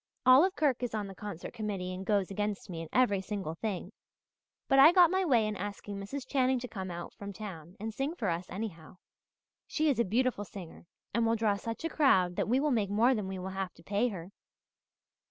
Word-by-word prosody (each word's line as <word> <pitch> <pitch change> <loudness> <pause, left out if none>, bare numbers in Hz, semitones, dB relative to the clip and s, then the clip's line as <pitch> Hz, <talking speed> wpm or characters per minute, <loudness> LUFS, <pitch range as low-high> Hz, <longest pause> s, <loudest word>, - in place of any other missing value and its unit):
Olive 290 +10 +6
Kirk 280 -6 +1
is 245 -3 -2
on 210 -1 -2
the 195 - -8
concert 195 -3 -7
committee 195 -4 -3
and 185 +1 -5
goes 200 -1 +1
against 205 -1 -3
me 165 -1 -5
in 165 - -8
every 220 -7 +3
single 190 -4 -4
thing. 190 +1 -4 0.8
But 270 - +4
I 300 +4 +10
got 355 -2 +6
my 380 0 +2
way 245 -10 +3
in 215 0 -2
asking 205 0 -6
Mrs. 250 +7 -5
Channing 260 -1 +2
to 250 0 -5
come 190 -5 -6
out 175 0 -6
from 200 0 -7
town 185 -5 -8
and 220 +2 -4
sing 275 +8 -2
for 225 - -2
us, 170 +2 -3
anyhow. 185 -4 -6 0.7
She 310 -1 +2
is 245 - -2
a - - +5
beautiful 235 +1 0
singer 180 -4 -10 0.3
and 235 +2 +2
will 225 - +3
draw 215 -2 +2
such 230 +8 -5
a - - 0
crowd 190 - +3
that - - -1
we 255 +3 +3
will 295 +1 +1
make 215 -6 +1
more 225 +6 +4
than 210 -5 -2
we 190 0 -4
will 185 +1 -5
have 190 -1 -4
to 165 - -18
pay 205 +6 +1
her. 185 -5 -6
210 Hz, 225 wpm, -31 LUFS, 190-250 Hz, 0.8 s, I